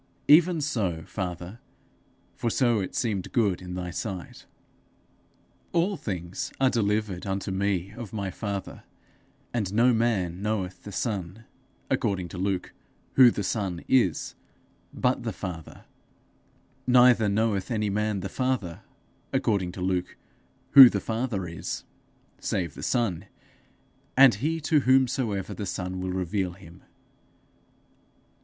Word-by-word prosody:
Even 165 Hz, +2 st, +6 dB
so, 100 Hz, -, -1 dB
Father, 90 Hz, +2 st, -5 dB, 0.8 s
for 120 Hz, -, -1 dB
so 120 Hz, -2 st, +2 dB
it 95 Hz, -, -4 dB
seemed 105 Hz, -6 st, -2 dB
good 100 Hz, -7 st, +1 dB
in 90 Hz, 0 st, -7 dB
thy 90 Hz, -1 st, -4 dB
sight. 95 Hz, 0 st, -6 dB, 1.3 s
'All 175 Hz, +4 st, +2 dB
things 90 Hz, -, -5 dB
are 130 Hz, -1 st, +4 dB
delivered 105 Hz, -4 st, -1 dB
unto 95 Hz, 0 st, -2 dB
me 95 Hz, -1 st, -1 dB
of 115 Hz, -3 st, -8 dB
my 100 Hz, -3 st, -3 dB
father; 100 Hz, 0 st, -5 dB, 0.7 s
and 105 Hz, -6 st, -1 dB
no 120 Hz, +4 st, +4 dB
man 100 Hz, -7 st, 0 dB
knoweth 95 Hz, -4 st, -2 dB
the 105 Hz, -, -7 dB
son,' 100 Hz, -1 st, -4 dB, 0.4 s
according 95 Hz, -3 st, -1 dB
to 90 Hz, -, -7 dB
Luke, 95 Hz, -1 st, -2 dB, 0.4 s
'who 130 Hz, -2 st, +8 dB
the 105 Hz, -, -3 dB
son 95 Hz, -4 st, -2 dB
is,' 105 Hz, -, +2 dB, 0.6 s
'but 125 Hz, 0 st, 0 dB
the 115 Hz, -1 st, -3 dB
father; 90 Hz, -5 st, -8 dB, 1.0 s
neither 125 Hz, -3 st, +6 dB
knoweth 100 Hz, -2 st, 0 dB
any 105 Hz, -4 st, 0 dB
man 105 Hz, -1 st, -1 dB
the 95 Hz, -, -3 dB
father,' 115 Hz, -7 st, -2 dB, 0.5 s
according 95 Hz, -5 st, 0 dB
to 95 Hz, -, -7 dB
Luke, 90 Hz, -1 st, -1 dB, 0.5 s
'who 135 Hz, -3 st, +11 dB
the -, -, -1 dB
father 110 Hz, -5 st, -2 dB
is,' 85 Hz, 0 st, -5 dB, 0.6 s
'save 85 Hz, -5 st, -2 dB
the -, -, -10 dB
son, 105 Hz, -7 st, 0 dB, 0.9 s
and 135 Hz, -2 st, +8 dB
he 155 Hz, +10 st, -1 dB
to 150 Hz, +1 st, +3 dB
whomsoever 130 Hz, -7 st, +1 dB
the 105 Hz, -, -5 dB
son 90 Hz, 0 st, -4 dB
will 95 Hz, 0 st, -3 dB
reveal 90 Hz, 0 st, -2 dB
him.' 90 Hz, -1 st, -15 dB
100 Hz, 130 wpm, -26 LUFS, 90-120 Hz, 1.3 s, who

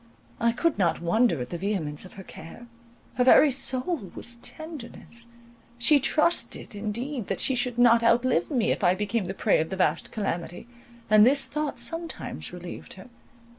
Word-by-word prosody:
I 235 Hz, -1 st, +2 dB
could 285 Hz, +3 st, -1 dB
not 170 Hz, -4 st, +1 dB
wonder 175 Hz, -, +2 dB
at 125 Hz, -, -6 dB
the 175 Hz, -, -4 dB
vehemence 180 Hz, -6 st, -3 dB
of 185 Hz, -, -13 dB
her 190 Hz, -, -10 dB
care; 185 Hz, +7 st, -12 dB, 0.5 s
her 250 Hz, -, +3 dB
very 275 Hz, +3 st, +6 dB
soul 260 Hz, -, 0 dB
was 240 Hz, 0 st, -3 dB
tenderness; 240 Hz, -5 st, -6 dB, 0.5 s
she 280 Hz, +5 st, +4 dB
trusted 310 Hz, +1 st, 0 dB
indeed 225 Hz, +4 st, -4 dB
that -, -, -2 dB
she 265 Hz, -, +2 dB
should 245 Hz, -1 st, -1 dB
not 235 Hz, -1 st, +5 dB
outlive 235 Hz, -5 st, +2 dB
me 245 Hz, -6 st, +1 dB
if -, -, -2 dB
I 180 Hz, +1 st, +4 dB
became 210 Hz, +1 st, -2 dB
the 190 Hz, -, -5 dB
prey -, -, +2 dB
of 160 Hz, -, -2 dB
the 190 Hz, -, -4 dB
vast 185 Hz, -, 0 dB
calamity, 175 Hz, -4 st, -4 dB, 0.4 s
and 215 Hz, -1 st, +6 dB
this 270 Hz, +4 st, +5 dB
thought 300 Hz, 0 st, -3 dB
sometimes 330 Hz, 0 st, -4 dB
relieved 180 Hz, 0 st, -8 dB
her. 190 Hz, +6 st, -13 dB
235 Hz, 170 wpm, -26 LUFS, 190-260 Hz, 0.5 s, very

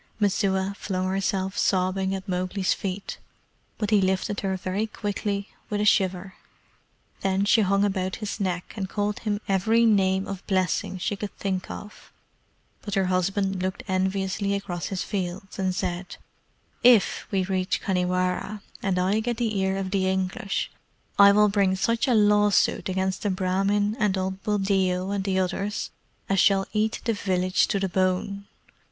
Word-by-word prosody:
Messua 195 Hz, -1 st, +1 dB
flung 185 Hz, -2 st, -2 dB
herself 190 Hz, 0 st, -1 dB
sobbing 190 Hz, 0 st, +1 dB
at 190 Hz, +1 st, -7 dB
Mowgli's 185 Hz, +1 st, 0 dB
feet, 195 Hz, 0 st, -5 dB, 0.6 s
but 210 Hz, -1 st, -2 dB
he 210 Hz, -2 st, +5 dB
lifted 190 Hz, +2 st, 0 dB
her 190 Hz, -1 st, -1 dB
very 190 Hz, +4 st, -2 dB
quickly 205 Hz, -1 st, -3 dB, 0.2 s
with 210 Hz, -, -1 dB
a 210 Hz, -, +1 dB
shiver. 190 Hz, -2 st, +2 dB, 0.9 s
Then 195 Hz, +1 st, +1 dB
she 220 Hz, +2 st, +5 dB
hung 200 Hz, 0 st, +3 dB
about 190 Hz, -2 st, -1 dB
his 210 Hz, -2 st, -5 dB
neck 180 Hz, -3 st, -2 dB
and 190 Hz, -3 st, -4 dB
called 205 Hz, 0 st, -1 dB
him 210 Hz, -2 st, -1 dB
every 220 Hz, +4 st, +3 dB
name 190 Hz, -3 st, +3 dB
of 195 Hz, -1 st, -6 dB
blessing 185 Hz, -1 st, 0 dB
she 195 Hz, +3 st, -2 dB
could 200 Hz, 0 st, -7 dB
think 190 Hz, -2 st, -2 dB
of, 210 Hz, -, -10 dB, 0.7 s
but 205 Hz, -1 st, -4 dB
her 195 Hz, -1 st, +2 dB
husband 190 Hz, +1 st, 0 dB
looked 185 Hz, +1 st, -3 dB
enviously 190 Hz, +1 st, 0 dB
across 180 Hz, -5 st, -4 dB
his 190 Hz, -2 st, -3 dB
fields, 190 Hz, 0 st, -4 dB
and 185 Hz, -1 st, 0 dB
said: 180 Hz, 0 st, -3 dB, 0.7 s
"IF 240 Hz, -4 st, +5 dB
we 195 Hz, -2 st, +1 dB
reach 185 Hz, 0 st, -1 dB
Khanhiwara, 185 Hz, +2 st, -1 dB, 0.2 s
and 195 Hz, -2 st, 0 dB
I 190 Hz, +4 st, +2 dB
get 235 Hz, +1 st, -2 dB
the 225 Hz, -3 st, -1 dB
ear 190 Hz, 0 st, 0 dB
of 190 Hz, -1 st, -3 dB
the 190 Hz, -1 st, +1 dB
English, 190 Hz, +1 st, -2 dB, 0.5 s
I 200 Hz, 0 st, +9 dB
will 210 Hz, +1 st, +5 dB
bring 200 Hz, -2 st, +2 dB
such 230 Hz, +6 st, +1 dB
a 250 Hz, -, +3 dB
lawsuit 210 Hz, -2 st, +3 dB
against 190 Hz, 0 st, -1 dB
the 205 Hz, -, 0 dB
Brahmin 195 Hz, +3 st, +1 dB
and 205 Hz, -2 st, +2 dB
old 190 Hz, +1 st, -3 dB
Buldeo 195 Hz, -2 st, 0 dB
and 200 Hz, -1 st, -1 dB
the 190 Hz, -1 st, 0 dB
others 195 Hz, +2 st, -2 dB, 0.4 s
as 195 Hz, -1 st, +2 dB
shall 195 Hz, 0 st, +4 dB
eat 215 Hz, +1 st, 0 dB
the 230 Hz, -, +2 dB
village 185 Hz, -2 st, +1 dB
to 200 Hz, -, 0 dB
the 195 Hz, -, 0 dB
bone. 190 Hz, +2 st, -1 dB
195 Hz, 160 wpm, -25 LUFS, 185-205 Hz, 0.9 s, I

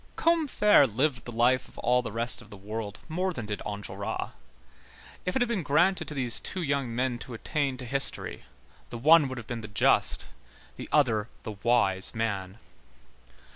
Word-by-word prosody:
Combeferre 290 Hz, -, +4 dB
lived 130 Hz, +2 st, -1 dB
the 120 Hz, -, -6 dB
life 120 Hz, +2 st, +2 dB
of -, -, -18 dB
all 125 Hz, +1 st, +2 dB
the 120 Hz, -, -6 dB
rest 115 Hz, +3 st, +2 dB
of 105 Hz, -, -16 dB
the 100 Hz, -, -11 dB
world 105 Hz, +1 st, -6 dB
more 180 Hz, +4 st, -1 dB
than 120 Hz, -10 st, -6 dB
did 105 Hz, -1 st, -4 dB
Enjolras. 100 Hz, -1 st, -5 dB, 1.0 s
If 180 Hz, -, -1 dB
it 265 Hz, -, +3 dB
had -, -, -2 dB
been 220 Hz, -6 st, 0 dB
granted 170 Hz, +3 st, +2 dB
to 150 Hz, -, -6 dB
these 125 Hz, -4 st, 0 dB
two 185 Hz, -, -4 dB
young 140 Hz, -5 st, -1 dB
men 125 Hz, -1 st, -1 dB
to 120 Hz, -, -8 dB
attain 140 Hz, +2 st, -2 dB
to 125 Hz, -, -7 dB
history, 135 Hz, +2 st, +1 dB, 0.5 s
the 120 Hz, -, -6 dB
one 155 Hz, +4 st, +6 dB
would 130 Hz, -1 st, -6 dB
have 120 Hz, -, -7 dB
been 120 Hz, 0 st, -5 dB
the 105 Hz, -, -7 dB
just, 105 Hz, 0 st, +1 dB, 0.5 s
the -, -, -8 dB
other 115 Hz, -7 st, +2 dB
the -, -, -5 dB
wise 100 Hz, -2 st, +2 dB
man. 100 Hz, -3 st, -3 dB
125 Hz, 180 wpm, -28 LUFS, 110-150 Hz, 1.0 s, one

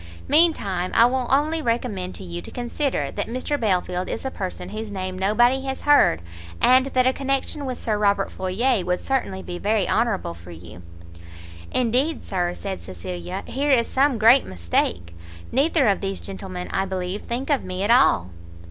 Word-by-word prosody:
Mean 325 Hz, +4 st, +6 dB
time, 185 Hz, -, -3 dB
I 230 Hz, -, +7 dB
will 250 Hz, 0 st, 0 dB
only 305 Hz, +4 st, +2 dB
recommend 230 Hz, -7 st, -2 dB
to -, -, -8 dB
you 85 Hz, -1 st, -6 dB
to -, -, -10 dB
consider 250 Hz, +3 st, -2 dB
that -, -, -3 dB
Mr 255 Hz, +5 st, -2 dB
Belfield 185 Hz, -4 st, 0 dB
is -, -, -4 dB
a 265 Hz, -, -2 dB
person 185 Hz, -3 st, -5 dB
whose 215 Hz, +1 st, -6 dB
name 185 Hz, -1 st, -4 dB
nobody 240 Hz, +7 st, +3 dB
has 265 Hz, 0 st, -4 dB
heard, 285 Hz, -, +4 dB, 0.4 s
and 255 Hz, +1 st, +5 dB
that 255 Hz, -2 st, +1 dB
a 260 Hz, -, +3 dB
connection 275 Hz, +1 st, -2 dB
with 255 Hz, -1 st, -3 dB
Sir 215 Hz, -2 st, -2 dB
Robert 200 Hz, -1 st, +1 dB
Floyer 195 Hz, +4 st, 0 dB
would 180 Hz, 0 st, -1 dB
certainly 220 Hz, -8 st, -2 dB
be 175 Hz, 0 st, -6 dB
very 210 Hz, -1 st, +1 dB
honourable 220 Hz, -, 0 dB
for 85 Hz, +1 st, -14 dB
you." 85 Hz, +1 st, -11 dB, 0.9 s
"Indeed, 255 Hz, +6 st, +1 dB
Sir," 175 Hz, -2 st, -2 dB
said 195 Hz, -2 st, -5 dB
Cecilia, 90 Hz, -1 st, -6 dB
"here 285 Hz, +3 st, -2 dB
is 245 Hz, -4 st, +4 dB
some 270 Hz, 0 st, +2 dB
great 230 Hz, +5 st, +6 dB
mistake; 85 Hz, -1 st, -2 dB, 0.4 s
neither 280 Hz, 0 st, +2 dB
of 200 Hz, -, +2 dB
these 195 Hz, -1 st, -2 dB
gentlemen, 190 Hz, -2 st, -6 dB
I 195 Hz, -, 0 dB
believe, 185 Hz, +1 st, -4 dB
think 255 Hz, +5 st, -3 dB
of 280 Hz, -, +2 dB
me 185 Hz, +1 st, -4 dB
at 210 Hz, -, +2 dB
all." 90 Hz, -, +4 dB
210 Hz, 180 wpm, -23 LUFS, 185-260 Hz, 0.9 s, I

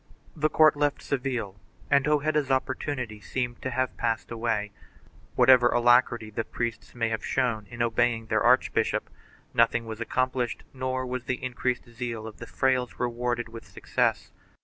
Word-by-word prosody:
The 155 Hz, -1 st, +1 dB
court 155 Hz, 0 st, +5 dB
left 145 Hz, 0 st, 0 dB
Seville 125 Hz, -7 st, -3 dB, 0.3 s
and 140 Hz, 0 st, +4 dB
Hojeda's 150 Hz, -1 st, +1 dB
opportunity 130 Hz, -4 st, -2 dB
seemed 120 Hz, 0 st, -3 dB
to 130 Hz, -, -2 dB
have 130 Hz, 0 st, -1 dB
passed 115 Hz, -1 st, -1 dB
away. 115 Hz, -3 st, -1 dB, 0.6 s
Whatever 125 Hz, -1 st, +6 dB
alacrity 120 Hz, -2 st, +3 dB
the 115 Hz, -, -2 dB
priests 120 Hz, +1 st, -5 dB
may 115 Hz, -1 st, 0 dB
have 110 Hz, -1 st, -3 dB
shown 110 Hz, -5 st, 0 dB
in 120 Hz, 0 st, -2 dB
obeying 115 Hz, 0 st, +1 dB
their -, -, +1 dB
archbishop, -, -, +2 dB, 0.4 s
nothing 115 Hz, 0 st, +3 dB
was 110 Hz, 0 st, -7 dB
accomplished 130 Hz, +1 st, -1 dB
nor 130 Hz, 0 st, -2 dB
was 125 Hz, 0 st, -4 dB
the 130 Hz, 0 st, -3 dB
increased 125 Hz, 0 st, -2 dB
zeal 115 Hz, -2 st, -5 dB
of 110 Hz, -1 st, -9 dB
the 115 Hz, -, -9 dB
frailes 130 Hz, -2 st, 0 dB
rewarded 120 Hz, 0 st, -1 dB
with 115 Hz, 0 st, -11 dB
success. -, -, -1 dB
120 Hz, 150 wpm, -27 LUFS, 115-130 Hz, 0.6 s, Whatever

